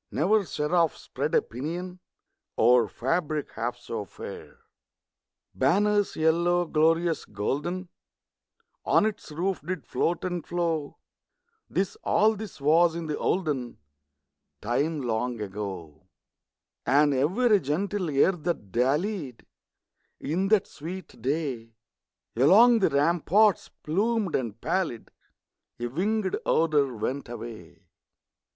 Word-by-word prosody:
Never 200 +6 +2
seraph 165 +1 +1
spread - - -3
a - - +4
pinion 175 +9 -6 0.6
Over 120 0 +5
fabric 150 - -2
half 120 +2 -3
so 115 -3 -5
fair! - - -10 0.9
Banners 205 +8 +2
yellow, 170 +2 +2
glorious, 165 +1 +2
golden, 150 - -3 1.0
On - - +3
its 215 -7 -4
roof 180 +4 -2
did 180 +5 -5
float 170 0 -1
and 175 -3 -3
flow, 165 -4 -2 0.7
(This 190 0 -1
all 220 +1 +3
this 215 -5 -8
was 160 +4 +4
in 170 -1 -4
the 150 -1 -3
olden 145 -10 -1 0.8
Time 145 +7 -1
long 120 0 -2
ago), 95 -5 -6 0.8
And 145 +2 +4
every 200 - +3
gentle 185 +5 -2
air 140 +6 +4
that 165 - -4
dallied, 140 - -1 0.7
In 175 +7 -1
that 210 -1 +3
sweet 170 -1 -9
day, 130 -5 -3 0.6
Along 215 - +6
the 190 - +3
ramparts 170 +7 +3
plumed 205 +3 -1
and 115 -4 -3
pallid, 175 -10 -2 0.7
A 120 - -2
winged 190 - -1
odor 150 -4 +2
went 130 +5 -3
away. 115 -1 -9
160 Hz, 110 wpm, -27 LUFS, 130-185 Hz, 1.0 s, Along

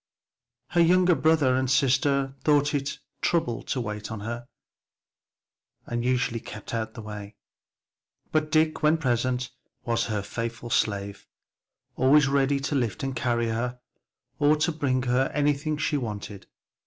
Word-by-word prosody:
Her 175 - +3
younger 180 +1 +5
brother 150 -3 +3
and 130 0 0
sister 135 +1 +2
thought 145 -1 +3
it 140 -1 -1
a - - -23 0.2
trouble 125 -9 0
to 130 - -2
wait 105 -3 -4
on 110 -2 -6
her 120 +3 -5 1.4
and 120 0 -3
usually 125 -2 0
kept 110 -1 -9
out 110 -1 -1
of 110 - -30
her 115 - -7
way, 105 -1 -8 1.0
but 155 -1 0
Dick, 155 0 +2
when 155 +1 +4
present, 125 -3 0 0.3
was 115 -1 +1
her 105 -3 -2
faithful 115 +2 -5
slave; 100 -2 -1 0.7
always 135 +2 +5
ready 140 0 +2
to 140 +1 -2
lift 130 +2 -1
and 135 -1 -2
carry 120 -1 0
her, 120 +2 -2 0.6
or 150 +1 +5
to 155 +3 +1
bring 135 -5 0
her 125 +2 +1
anything 150 +1 +1
she 150 0 0
wanted. 105 -5 -6
130 Hz, 150 wpm, -26 LUFS, 115-145 Hz, 1.4 s, younger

